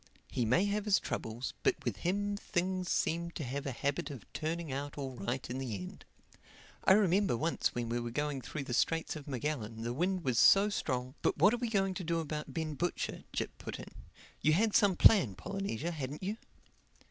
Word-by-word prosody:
He 120 - 0
may 145 - +3
have 205 +1 -1
his 210 -2 +5
troubles; 115 +3 -4
but - - +3
with 115 -6 -1
him 205 - 0
things 185 -2 -1
seem 170 +1 0
to 160 - -4
have 140 +3 -3
a - - -1
habit 140 +3 -1
of 135 -6 -8
turning 160 0 -3
out 140 +2 -4
all 135 -2 -4
right 120 +4 -3
in 125 +2 -4
the 125 -5 -3
end. 90 -2 -8 0.8
I - - +8
remember 195 - +3
once 165 +6 0
when 120 -1 -1
we 120 +1 0
were 120 0 -3
going 145 +2 -2
through 140 +4 -5
the 130 - -5
Straits 165 +7 +1
of 150 -2 -8
Magellan 120 -5 -3
the 120 +1 -2
wind 180 +5 0
was 125 -5 +2
so 200 +2 +7
strong—" 130 -9 -2
"But - - +1
what 190 +9 +6
are - - +1
we 240 -1 -2
going 195 -3 +1
to 185 - -5
do 165 0 0
about 150 -1 -4
Ben 160 -2 -2
Butcher?" 175 +5 -2
Jip - - -3
put - - -5
in. - - -9 0.5
"You 155 - +4
had 215 +5 +3
some 200 -4 +5
plan 170 - +6
Polynesia, 175 - -3
hadn't 145 0 -5
you?" 205 +4 -2
155 Hz, 205 wpm, -33 LUFS, 130-185 Hz, 0.8 s, I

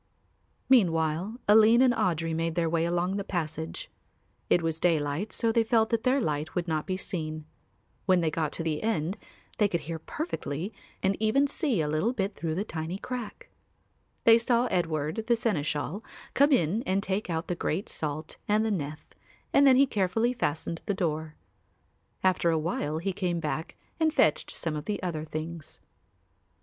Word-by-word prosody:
Meanwhile 180 -2 +2
Aline 220 +4 +7
and 250 -2 +5
Audry 165 -6 0
made 165 0 -1
their 170 -1 +1
way 165 0 +1
along 175 +3 0
the 200 - -2
passage. 165 - -4 0.6
It 175 - +4
was 165 -1 -1
daylight 160 +3 +1
so 230 -1 +1
they 230 0 +3
felt 225 0 +2
that 230 -1 +2
their 260 +3 +2
light 155 - -2
would 180 -1 -1
not 155 -2 -1
be 185 - -1
seen. 155 -4 -4 0.6
When 185 -2 +5
they 165 -2 +1
got 155 -1 -1
to 165 - -3
the 155 -2 -1
end 190 -5 0 0.4
they 210 - +5
could 170 -4 -2
hear 160 +2 -5
perfectly 195 - -4 0.3
and 195 +1 +2
even 220 +6 +3
see 280 - 0
a 150 - -1
little 155 +11 +1
bit 200 -3 -1
through 165 -3 -3
a 200 - 0
tiny 165 -2 -4
crack. 250 - -6 0.7
They 230 0 +7
saw 235 +1 +2
Edward, 165 +2 -1
the 240 - +4
seneschal, 170 -3 -2 0.3
come 285 +2 +4
in 205 - +2
and 190 +1 +1
take 195 0 -2
out 160 0 -2
the - - -1
great 175 +2 -2
salt 155 +1 -3
and 215 +1 +2
the 220 - 0
nef 155 -5 -4 0.5
and 280 0 +6
then 260 - +7
he 275 +2 +6
carefully 225 +1 +1
fastened 165 -6 -2
the 200 - 0
door. 160 -4 -2 0.9
After 185 -2 +3
a 165 - +2
while 155 -1 -2
he 190 +4 -2
came 180 -2 -1
back 160 0 -3 0.2
and 320 -1 +3
fetched - - +2
some 160 -2 -4
of 150 0 -5
the 210 - -2
other 160 -4 -3
things. 155 0 -7
175 Hz, 180 wpm, -28 LUFS, 160-220 Hz, 0.9 s, Aline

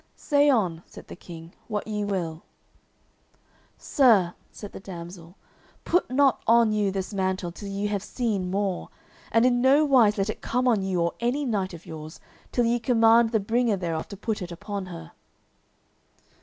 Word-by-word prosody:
"Say 290 -1 +2
on," 185 -11 +1
said - - -13
the - - -8
King, 170 -1 -11
"what 210 -2 -3
ye 210 -1 -2
will." 175 -5 -3 1.4
"Sir," 215 - +3 0.2
said 205 - -9
the - - -9
damsel, 175 -2 -10 0.5
"put 355 - +1
not 270 0 +3
on 230 -1 +5
you 210 -2 +1
this 190 +1 -4
mantle 190 -2 -1
till 200 +3 -9
ye 200 +1 -3
have 205 -1 -1
seen 210 -4 -2
more, 195 -1 -2 0.4
and 230 +2 +4
in 245 -1 +3
no 275 +4 +5
wise 240 -7 +4
let 195 0 0
it - - -11
come 250 +1 0
on 225 -5 +3
you 190 -2 -1
or 170 0 0
any 250 +5 0
knight 195 -7 -2
of 165 - -14
yours, 155 0 -9 0.3
till 245 - +1
ye 235 +1 +1
command 230 -1 +4
the 220 - +2
bringer 225 +1 +1
thereof 165 -3 -3
to 200 - -9
put 215 +1 -3
it 180 -1 -6
upon 200 +2 -6
her." 80 - -9
205 Hz, 175 wpm, -25 LUFS, 185-235 Hz, 1.4 s, on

